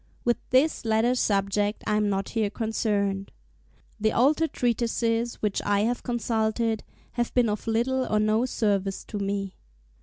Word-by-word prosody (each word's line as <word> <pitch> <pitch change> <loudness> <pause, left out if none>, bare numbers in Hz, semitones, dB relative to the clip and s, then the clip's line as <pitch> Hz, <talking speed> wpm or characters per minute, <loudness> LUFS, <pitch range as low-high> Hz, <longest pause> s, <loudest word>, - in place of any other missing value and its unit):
With 240 0 +3
this 270 +5 +3
latter 225 +2 +2
subject 205 -2 0
I 210 - +1
am 210 -1 +2
not 195 0 -1
here 220 -3 0
concerned. 205 -3 -1 0.7
The 220 +1 +2
older 295 +6 +3
treatises, 235 -2 0
which 210 -2 0
I 205 0 +1
have 240 +3 0
consulted, 225 -1 -1 0.3
have 240 -1 -2
been 245 -3 +4
of 210 +2 -3
little 250 +4 +1
or 215 - +3
no 215 +3 +2
service 200 -5 -1
to 210 - -6
me. 195 -1 -2
220 Hz, 150 wpm, -26 LUFS, 205-240 Hz, 0.7 s, been